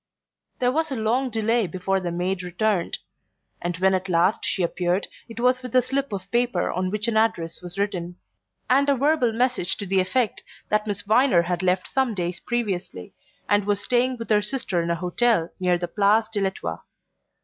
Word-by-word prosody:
There 250 0 +2
was 320 +4 0
a 270 - -3
long 240 +4 0
delay 225 -1 +1
before 185 +3 -1
the 175 -2 -3
maid 180 +2 -1
returned, 180 +1 -1 0.6
and 175 -1 -2
when 190 +1 +3
at 185 0 -1
last 175 +4 +2
she 190 - 0
appeared 175 +2 0 0.2
it 230 0 -8
was 250 +1 +2
with 250 -1 -7
a 255 - +7
slip 270 +1 -2
of 195 -1 -6
paper 240 -7 +1
on 185 +1 -1
which 210 +3 -2
an 225 -2 +1
address 175 -7 0
was 180 +1 -7
written, 180 -4 -2 0.5
and 275 +3 +3
a 280 - +4
verbal 275 -2 +2
message 240 -5 0
to 200 - -4
the 190 0 +2
effect 210 +5 0 0.3
that 210 0 +1
Miss 205 - -3
Viner 215 -4 +4
had 175 +1 -2
left 185 0 +1
some 260 -5 0
days 175 -1 -2
previously, 195 - -3 0.3
and 205 -1 +2
was 205 -1 +1
staying 250 +4 +1
with 230 -1 -6
her 210 -1 +5
sister 210 -6 -1
in 170 - -3
a 170 - +1
hotel 180 +1 +1
near 180 -1 +2
the 175 0 -3
Place 210 +4 +2
de 210 -3 -2
l'Etoile. 185 - -3
205 Hz, 195 wpm, -24 LUFS, 180-240 Hz, 0.6 s, a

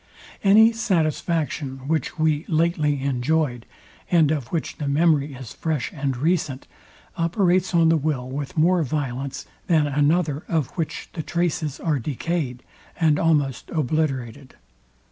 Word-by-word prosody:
Any 215 +3 +7
satisfaction, 155 - -1
which 160 +2 -1
we 155 -1 +1
lately 155 -4 +1
enjoyed, 135 -1 0 0.4
and 160 -4 +4
of 145 -6 -2
which 165 +3 -3
the 145 - -3
memory 145 -1 +2
is 130 -3 -9
fresh 155 -6 -2
and 135 -3 -2
recent, 150 -2 0 0.5
operates 180 +1 +1
on 165 -1 +5
the 165 - +4
will 140 -4 -2
with 140 +4 -5
more 175 +3 +4
violence, 135 -2 -3 0.2
than 160 -3 +3
another 150 +1 +1
of 160 -6 0
which 165 -3 -4
the 160 - -3
traces 160 -3 -2
are 155 -4 0
decayed, 140 0 -3 0.4
and 155 -3 +3
almost 145 -6 +1
obliterated. 140 -4 -2
155 Hz, 130 wpm, -23 LUFS, 135-165 Hz, 0.5 s, Any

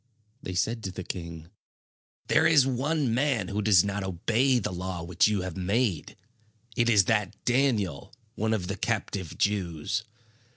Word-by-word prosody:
They 95 - -6
said 115 +5 -1
to 95 - -3
the 90 - -7
king: 85 -2 -7 0.7
"There - - +4
is 150 -5 +5
one 135 0 0
man 125 -6 0
who 105 +1 -2
does 100 -4 +5
not 100 0 -2
obey 115 +8 +1
the 110 - -2
law 90 -1 -4
which 85 +2 +2
you 105 -3 0
have 95 -3 -5
made. 95 - -1 0.6
It 120 0 +2
is 105 -5 +5
that 105 -2 0
Daniel, 115 - 0 0.2
one 110 -1 0
of 95 -5 -3
the 100 +2 -4
captive 100 -5 -3
Jews. 100 -1 -1
100 Hz, 160 wpm, -27 LUFS, 90-120 Hz, 0.7 s, is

